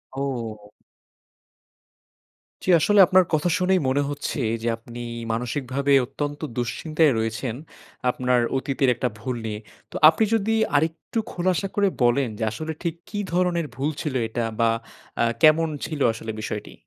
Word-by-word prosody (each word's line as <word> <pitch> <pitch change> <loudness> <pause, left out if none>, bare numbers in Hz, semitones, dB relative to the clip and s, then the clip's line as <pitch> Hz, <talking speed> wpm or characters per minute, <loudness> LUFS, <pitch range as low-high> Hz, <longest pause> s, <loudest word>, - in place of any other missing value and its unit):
ও! 115 -6 -4 1.9
জী - - -3
আসলে 205 +6 +3
আপনার 185 0 +5
কথা 155 +3 +2
শুনেই 185 +1 +3
মনে 140 +2 +2
হচ্ছে, 145 0 -4 0.2
যে 115 - -3
আপনি 120 +1 -11 0.3
মানসিকভাবে 130 +4 -2
অত্যন্ত 145 +3 -4 0.2
দুশ্চিন্তায় 155 +6 +1
রয়েছেন। 115 +1 -2 0.5
আপনার 125 0 +1 0.2
অতীতের 135 0 0
একটা 125 - -1
ভুল 125 +2 -3
নিয়ে। 105 -1 -4 0.3
তো - - -12
আপনি 165 +7 +1
যদি 225 0 +1 0.2
আরেকটু 160 +8 0
খোলাসা 185 +2 0
করে 205 -1 +3 0.2
বলেন, 120 +2 +3
যে 115 - -3
আসলে 155 +9 -5
ঠিক 170 -2 -1
কি 205 - -4
ধরনের 175 -2 +1
ভুল 135 +4 -1
ছিল 150 - -3
এটা? 115 +1 -2 0.2
বা 115 0 +4 0.5
আ - - +4 0.2
কেমন 160 +1 +6 0.2
ছিল 155 -2 -5
আসলে 110 0 -6
বিষয়টি? 105 -1 -5
140 Hz, 140 wpm, -24 LUFS, 120-165 Hz, 1.9 s, কেমন